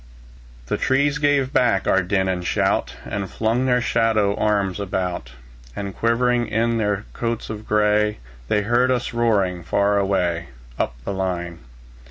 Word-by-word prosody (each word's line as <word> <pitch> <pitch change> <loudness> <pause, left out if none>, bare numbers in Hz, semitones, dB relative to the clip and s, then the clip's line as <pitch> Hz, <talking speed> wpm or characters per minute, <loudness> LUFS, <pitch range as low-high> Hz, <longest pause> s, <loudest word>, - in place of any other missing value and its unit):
The - - -1
trees 140 +2 +1
gave 145 -2 +2
back 115 -6 +2
our 95 - +4
din 95 +1 0
and 90 -1 -1
shout, - - 0
And 100 -2 -4
flung 115 +4 0
their 125 -1 +3
shadow 110 -4 +2
arms 100 -3 0
about; 90 -9 -3 0.4
And 100 -1 -4
shivering 120 +1 +2
in 115 +1 0
their 105 -1 -1
coats 115 -1 -3
of 110 0 -8
gray, 105 0 +2 0.3
They 105 +8 +1
heard 120 +4 +2
us 125 -2 -1
roaring 100 -7 +1
far 100 +4 +1
away, 90 -4 0 0.3
Up - - -1
the - - -2
line. 90 -3 -3
105 Hz, 150 wpm, -22 LUFS, 95-115 Hz, 0.4 s, our